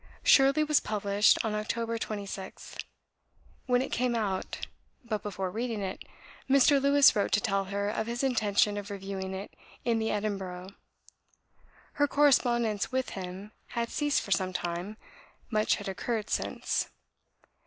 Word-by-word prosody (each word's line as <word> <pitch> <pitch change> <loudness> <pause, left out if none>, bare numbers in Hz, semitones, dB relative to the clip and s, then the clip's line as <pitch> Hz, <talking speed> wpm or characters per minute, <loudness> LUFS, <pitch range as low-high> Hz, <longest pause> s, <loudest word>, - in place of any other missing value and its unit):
"Shirley" 275 +3 +6
was 300 -1 +3
published 205 0 +2
on 220 - -1
October 230 +2 -2
26th. 200 -3 -6 0.8
When 250 0 +3
it - - -6
came 245 0 0
out, 200 -4 -2 0.4
but 215 -3 -2
before 190 -2 -4
reading 230 0 -3
it, 190 -1 -4 0.5
Mr. 275 +1 +5
Lewes 280 0 +6
wrote 205 - +1
to - - +5
tell 195 -3 0
her 200 +1 -2
of 220 +1 -2
his 240 +2 -2
intention 210 -4 +2
of 205 0 -5
reviewing 195 -1 -5
it 195 +2 -7 0.3
in 230 -2 +2
the 220 0 -1
Edinburgh. 195 -3 -3 1.2
Her 290 0 +2
correspondence 240 -7 +2
with 260 0 -1
him 190 +2 -7 0.3
had 235 0 0
ceased 290 -1 +1
for 200 - -9
some 185 -1 +1
time: 175 +4 -4 0.5
much 215 -1 +2
had 205 - -7
occurred 215 +3 -3
since. - - -1
215 Hz, 145 wpm, -29 LUFS, 195-240 Hz, 1.2 s, Shirley